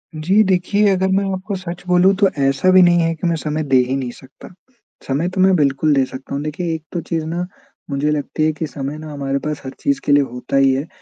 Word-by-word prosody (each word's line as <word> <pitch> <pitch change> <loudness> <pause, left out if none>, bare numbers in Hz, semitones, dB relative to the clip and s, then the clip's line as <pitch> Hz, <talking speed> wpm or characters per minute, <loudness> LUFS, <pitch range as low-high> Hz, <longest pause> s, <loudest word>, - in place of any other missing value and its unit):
जी 190 +8 +3
देखिए, 195 +2 +2
अगर 190 0 +1
मैं 195 +1 +2
आपको 195 +2 -4
सच 175 -1 -7
बोलूँ 180 +2 +4
तो 195 0 +3 0.2
ऐसा 135 +7 +2
भी 185 0 +7
नहीं 175 -1 +5
है 165 0 +1
कि 170 - -3
मैं 165 - +1
समय 155 0 -3
दे 135 -2 +2
ही 135 - -1
नहीं 130 -3 -3
सकता। 130 +2 -15 0.6
समय 145 +6 0
तो 185 0 -2
मैं 190 0 +5
बिल्कुल 145 0 +2
दे 135 - +3
सकता 130 +1 -9
हूँ 145 - -3
देखिए 165 +2 -3
एक 155 - -8
तो 175 - -3
चीज़ 160 -1 -3
ना 170 +2 -3 0.4
मुझे 140 +2 0
लगती 150 +1 -1
है 155 - +2
कि 160 - -4
समय 140 +2 -5
ना 155 -1 -8
हमारे 140 -1 -2
पास 150 0 -4
हर 130 - -5
चीज़ 280 -1 0
के - - +1
लिए 145 0 +5
होता 125 +1 -6
ही 135 -1 +4
है 140 +5 -2
155 Hz, 250 wpm, -19 LUFS, 140-185 Hz, 0.6 s, भी